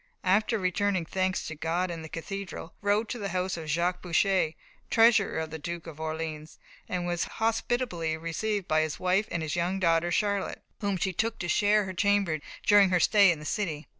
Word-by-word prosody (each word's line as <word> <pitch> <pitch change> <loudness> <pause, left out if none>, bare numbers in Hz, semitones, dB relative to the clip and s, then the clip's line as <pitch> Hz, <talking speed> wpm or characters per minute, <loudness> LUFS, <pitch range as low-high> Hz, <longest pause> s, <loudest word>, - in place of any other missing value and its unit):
After 210 +5 +2
returning 185 -1 0
thanks 185 +2 -1
to - - -5
God 170 +4 -1
in 165 -1 -5
the 160 - -9
cathedral, 195 +1 -6
she 200 - -24
rode 210 +2 +2
to 245 - -4
the 200 -2 -3
house 185 0 -1
of 160 -2 -7
Jacques 175 +4 0
Boucher, 180 -1 +2 0.4
treasurer 225 -7 +4
to 160 - -3
the 160 - -6
Duke 170 +2 -5
of 160 -2 -10
Orleans, 155 -1 -5 0.3
and 180 -1 -2
was 175 -1 -1
hospitably 225 -7 0
received 185 +5 -2
by 155 0 +3
his 155 -1 -3
wife 185 +4 +1
and 170 -2 -2
his 155 - -2
young 175 +3 0
daughter 170 -1 +2
Charlotte, 200 +1 -1 0.2
whom 200 -2 -1
she 190 +1 -1
took 225 +5 -1
to 175 - -4
share 210 +3 +3
her 190 - -5
chamber 200 -5 +2 0.3
during 205 -2 +6
her 180 -1 +3
stay 200 +3 +5
in 170 - -2
the 150 - -10
city. 165 -6 -2
180 Hz, 200 wpm, -28 LUFS, 165-205 Hz, 0.4 s, during